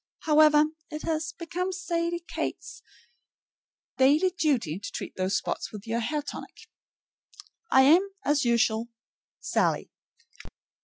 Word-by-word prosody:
However, 305 -1 +5 0.3
it 305 -1 -6
has 320 -1 -2
become 360 +2 -3
Sadie 340 -2 -2
Kate's 455 - -5 1.2
daily 300 +8 +4
duty 260 - 0
to 200 - -7
treat - - -6
those 185 +2 0
spots - - -4
with 210 0 -9
your 230 +1 -1
hair 295 +6 -2
tonic. - - -9 1.0
I 265 - +6
am, 345 +8 +5 0.2
as 290 -1 +2
usual, 235 -1 +2 0.5
SALLIE. - - 0
300 Hz, 115 wpm, -27 LUFS, 235-335 Hz, 1.2 s, I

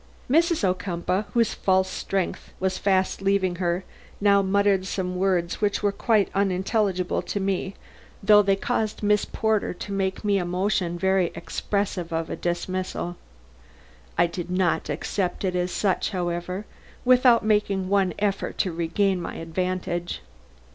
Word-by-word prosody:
Mrs. 330 +1 +3
Ocumpaugh, 185 +1 0
whose 230 -1 +3
false 190 -1 +2
strength 190 0 -3
was 190 0 -1
fast 190 -1 +1
leaving 195 -2 +1
her, 175 0 0 0.4
now 200 -1 +5
muttered 195 -1 +2
some 180 -1 -2
words 180 -1 0
which 205 0 0
were 205 - +3
quite 215 0 +2
unintelligible 195 -1 0
to 205 - -3
me, 195 0 -1 0.5
though 210 +1 +7
they 195 -1 +2
caused 220 +1 -2
Miss 210 0 +3
Porter 220 -4 0
to 200 - -7
make 195 0 -1
me 200 -1 +3
a - - -1
motion 180 0 0
very 190 0 +2
expressive 180 +1 -2
of 165 0 -2
a - - -2
dismissal. 175 0 -3 1.0
I - - +5
did 175 +1 -5
not 180 -3 +1
accept 175 +6 -2
it 185 -1 -1
as 180 0 0
such, 195 -4 0
however, 180 +1 -3 0.4
without 250 -2 +5
making 205 -3 +1
one 195 -1 +2
effort 200 -1 -1
to 185 - 0
regain 180 +3 0
my - - -5
advantage. 175 - -3
190 Hz, 145 wpm, -25 LUFS, 180-200 Hz, 1.0 s, though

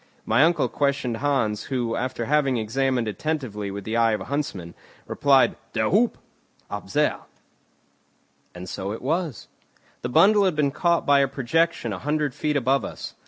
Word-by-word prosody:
My 115 +6 +4
uncle 170 +2 +3
questioned 140 -4 -1
Hans, 115 -6 0
who, 120 -4 -2
after 125 -2 -3
having 140 -2 +2
examined 125 +2 0
attentively 110 -3 -3
with 100 0 -6
the 110 +3 -2
eye 115 -1 +3
of 105 - -2
a - - -6
huntsman, 105 - -4 0.3
replied: 140 -2 +3 0.2
"Der 110 -2 0
huppe!" 225 +6 +3 0.6
"Up - - -6
there." - - +1 1.4
And 90 +1 -8
so 95 +2 -4
it 110 - -7
was. 160 -1 -2 0.5
The 120 - -3
bundle 200 +9 +5
had 185 -4 +1
been 145 -2 +1
caught 170 +3 +1
by 140 -1 +5
a 140 - +3
projection 140 -1 0
a 95 - -5
hundred 150 +4 -1
feet 150 +2 -1
above 135 -1 +1
us. - - -7
135 Hz, 165 wpm, -24 LUFS, 115-150 Hz, 1.4 s, bundle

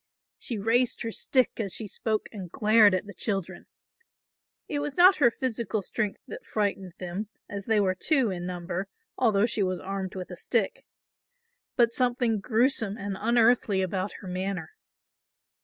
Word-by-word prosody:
She 235 - -4
raised 230 +5 +1
her 225 - -3
stick 255 +3 +2
as 200 -4 -1
she 220 - -2
spoke 215 +1 -2
and 190 -6 -8
glared 215 -2 +5
at 185 - -2
the 205 - -9
children. 190 -2 -3 1.0
It 290 - -2
was 290 +1 -4
not 365 +2 +7
her 265 -5 +5
physical 230 -4 -2
strength 210 +1 -3
that 470 +2 -8
frightened 195 - -2
them, 185 +4 -5 0.2
as 200 -1 -6
they 220 -2 +3
were 190 -2 +2
two 255 - +1
in 175 -1 -4
number, 180 +1 -4 0.3
although 220 -4 +3
she 230 -3 -1
was 185 -2 0
armed 195 -1 -5
with 185 0 -6
a 180 - -7
stick, 220 -1 -1 0.9
but 235 -2 +3
something 245 -3 +1
gruesome 225 -1 +1
and 200 -1 -4
unearthly 225 -3 +3
about 185 +1 -2
her 195 - -9
manner. 185 -2 -3
210 Hz, 160 wpm, -27 LUFS, 190-235 Hz, 1.0 s, not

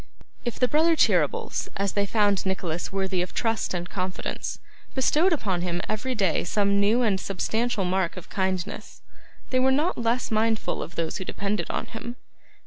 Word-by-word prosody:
If 240 - -2
the 250 - +3
brothers 320 +4 +3
Cheeryble, - - +2 0.2
as 200 -1 0
they 200 -1 0
found 205 -2 +2
Nicholas 180 -3 -2
worthy 190 -2 0
of 180 - -4
trust 225 -1 0
and 175 0 -3
confidence, 185 -1 -3 0.4
bestowed 305 +7 +3
upon 195 - 0
him 175 -1 -1
every 230 +4 -2
day 195 -7 +2
some 200 -1 +2
new 220 +5 +3
and 200 -4 +2
substantial 220 +2 -1
mark 185 -1 0
of 180 - -8
kindness, 190 -2 -3 0.5
they 255 - +3
were 260 +1 +4
not 300 +5 +1
less 235 +1 0
mindful 220 0 +1
of 175 - -7
those 165 -1 -1
who - - -4
depended 200 +3 -2
on - - -2
him. 235 +2 -7
200 Hz, 170 wpm, -26 LUFS, 185-240 Hz, 0.5 s, were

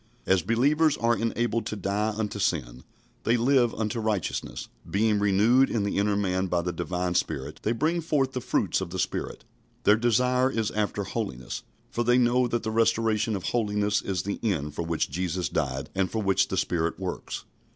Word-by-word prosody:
As 95 -1 +3
believers 145 - +2
are 115 0 +2
enabled 115 0 -1
to - - -3
die 100 +2 -1
unto 105 -2 -2
sin, 65 -10 -1 0.4
they 120 +1 +3
live 120 0 +3
unto 110 +1 -2
righteousness. 110 -6 -2 0.2
Being 105 +1 +2
renewed 105 +6 +4
in 110 -3 0
the 100 -1 0
inner 100 0 +2
man 95 -2 0
by 85 -1 0
the 90 0 -2
Divine 90 +1 -2
Spirit, 75 -3 -2
they 110 - 0
bring 160 +9 0
forth 145 -5 +1
the 125 - -4
fruits 95 -5 0
of 95 - -4
the 95 - -5
Spirit. - - -3 0.4
Their 105 +1 +5
desire 125 +3 +2
is 115 -5 -1
after 105 -1 -1
holiness, 95 - -4 0.3
for 120 - 0
they 120 +1 +4
know 125 0 +3
that 120 -1 -2
the 110 - -2
restoration 110 -1 +2
of 95 - -4
holiness 105 -3 0
is 95 -2 -2
the 100 - -3
end 75 -10 -1
for 75 - -3
which 85 -3 -1
Jesus 90 +1 -2
died 65 0 -2
and 95 -1 0
for 110 -1 -2
which 95 -1 +3
the - - -3
Spirit 85 0 0
works. 95 -2 -5
105 Hz, 190 wpm, -27 LUFS, 90-115 Hz, 0.4 s, Their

